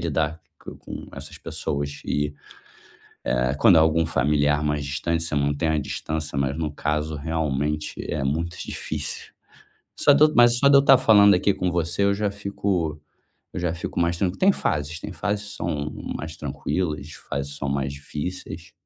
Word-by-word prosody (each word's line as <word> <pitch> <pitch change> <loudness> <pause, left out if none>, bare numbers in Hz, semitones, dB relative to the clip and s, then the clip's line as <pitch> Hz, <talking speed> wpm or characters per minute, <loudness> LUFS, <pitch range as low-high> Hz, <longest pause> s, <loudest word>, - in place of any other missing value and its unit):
lidar 80 0 -1 0.2
com - - -10
com - - -8
essas - - -10
pessoas 70 0 -4
e, 75 0 -1 1.0
eh, 60 +1 +1
quando 105 -6 +7
é - - +7
algum 80 +1 +3
familiar 75 -1 +2
mais 75 -1 0
distante 80 +4 -1
você 80 -3 -2
mantém 70 +3 +1
a 80 - +2
distância, 75 +1 -4
mas 70 +1 0
no 80 -2 -2
caso 75 +1 -1
realmente 75 -1 -2 0.2
é 75 -3 -1
muito 80 +5 -2
difícil. - - -5 0.6
Só 145 - +4
de 145 +2 +6
eu 155 - +5
mas 120 0 +6
só 140 - +4
de 140 - +6
eu - - +8
estar 135 -1 +7
falando 105 -5 +6
aqui 95 +2 +2
com 90 - -1
você 85 +2 0
eu 100 0 +3
já 105 0 -1
fico, 100 -6 -2 0.6
eu - - -3
já 85 -2 0
fico 85 - -5
mais 85 0 +1
tranquilo. 95 0 -1
Tem 195 +1 +5
fases, 80 - -2
tem - - -6
fases 105 0 -3
são 75 0 -2 0.2
mais 80 +1 -6
tranquilas, 75 +1 -3
fases 70 -2 -5
são 70 - -3
mais 70 0 -1
difíceis. 80 +4 -6
80 Hz, 175 wpm, -24 LUFS, 75-90 Hz, 1.0 s, eu